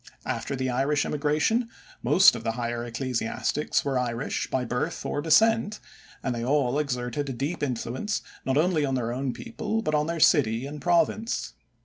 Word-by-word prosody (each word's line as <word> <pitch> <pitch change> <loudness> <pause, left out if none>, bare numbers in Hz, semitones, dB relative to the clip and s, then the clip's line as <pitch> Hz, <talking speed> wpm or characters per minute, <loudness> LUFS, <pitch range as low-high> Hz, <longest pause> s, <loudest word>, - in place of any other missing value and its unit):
After 140 - -2
the 130 0 -2
Irish 140 +4 +1
immigration 150 - +1 0.3
most - - +6
of - - -6
the 115 - -1
higher 120 0 -3
ecclesiastics 125 +4 -1
were 135 -2 +1
Irish 120 0 -2
by 130 -1 -1
birth 125 +2 -3
or 145 - -1
descent, 215 +6 +3 0.4
and 130 - -1
they 115 -1 -3
all 135 +1 +1
exerted 135 0 -2
a - - -2
deep 140 +8 -3
influence 130 - -2 0.2
not 130 +1 0
only 160 -1 +2
on 135 -2 0
their 120 -2 -1
own 130 +1 -2
people 225 - -3
but 155 - -1
on 150 0 +2
their 170 0 -2
city 125 -6 +4
and 145 +1 -7
province. 180 +6 +1
140 Hz, 170 wpm, -26 LUFS, 125-155 Hz, 0.4 s, most